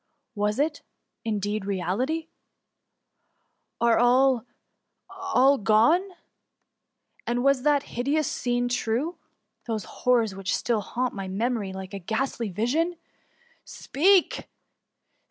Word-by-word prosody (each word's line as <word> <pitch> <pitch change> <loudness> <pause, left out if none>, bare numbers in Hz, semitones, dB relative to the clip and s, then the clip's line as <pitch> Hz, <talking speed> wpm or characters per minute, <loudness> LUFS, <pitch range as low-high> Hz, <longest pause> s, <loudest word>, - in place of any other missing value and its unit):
Was 210 +1 -1
it^ 295 +1 0 0.4
indeed, 210 -2 -2
reality? 210 - -2 1.5
Are 235 -1 +3
all, 250 0 +3 0.6
all 330 -9 +2
gone? 220 - +4 1.3
And 245 +1 0
was 275 -1 +3
that 290 0 +2
hideous 285 +6 -1
scene 245 0 -1
true? 245 +7 -1 0.2
— - - -39
those 220 -3 -2
horrors, 235 -5 +1
which 195 0 -2
still 230 -3 0
haunt 250 +4 -2
my 195 -2 -5
memory 210 +1 -2
like 190 0 -8
a 200 - -4
ghastly 230 +3 -2
vision? 275 - 0 0.7
Speak 365 +5 +2
245 Hz, 105 wpm, -26 LUFS, 210-275 Hz, 1.5 s, gone